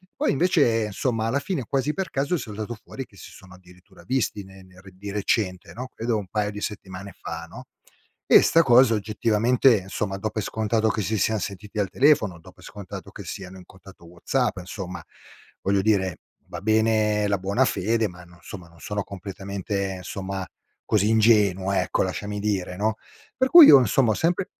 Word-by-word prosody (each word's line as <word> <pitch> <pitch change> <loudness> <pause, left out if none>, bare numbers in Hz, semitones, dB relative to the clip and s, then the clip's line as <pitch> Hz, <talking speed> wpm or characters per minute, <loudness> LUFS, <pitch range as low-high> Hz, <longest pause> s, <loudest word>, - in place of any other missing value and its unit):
Poi - - +1
invece, 140 - +2
insomma 110 +1 -2
alla 130 +5 0
fine 145 -5 -3
quasi 135 +2 0
per 190 0 -3
caso 140 +5 -1
è - - 0
saltato 110 -3 -6
fuori 135 - -8
che 105 - -23
si - - -12
sono 95 -2 -15
addirittura 90 0 -19
visti 125 -5 -1
ne 95 0 -15
ner 95 +1 -16
di 100 +2 -8
recente, 100 -2 -1
no, 125 +2 -6
credo 115 -1 -1
un 100 -3 -5
paio 105 0 -1
di 105 0 -8
settimane 100 -1 -7
fa, - - -6
no? - - -11 0.6
E - - +7
'sta 165 - +4
cosa 120 -3 +5
oggettivamente, 110 +2 +2
insomma, 95 0 -3
do 110 +2 -3
per 110 0 -4
scontato 110 +1 0
che 110 - -1
si 110 +2 -1
sian 110 +3 +1
sentiti 100 +1 -6
al 100 -2 0
telefono, 125 - +2
do 80 - -15
per - - -20
scontato 100 -3 -9
che - - -9
siano 95 -1 -8
in 90 - -13
contatto 95 -1 -16
WhatsApp, 100 +8 -2
insomma, 90 +1 -7 0.6
voglio 100 0 +1
dire, 95 -4 +1 0.3
va - - -8
bene 110 -1 +2
la 100 -1 +1
buona 100 +8 +1
fede, 115 +1 0
ma 90 0 -13
no 90 0 -18
insomma 90 0 -10
non 85 0 -20
sono 105 +2 -4
completamente, 100 0 -5
insomma, 95 +1 -5 0.4
così 105 -1 +2
ingenuo, 105 -4 +3
ecco, 95 -1 +1
lasciami 100 +2 -4
dire, 100 -3 -2
no. 110 +2 0 0.4
Per 260 +1 +2
cui 340 0 +11
io 140 - +10
insomma 120 0 +2
ho - - +2
sempre 175 - 0
105 Hz, 190 wpm, -24 LUFS, 95-115 Hz, 0.6 s, cui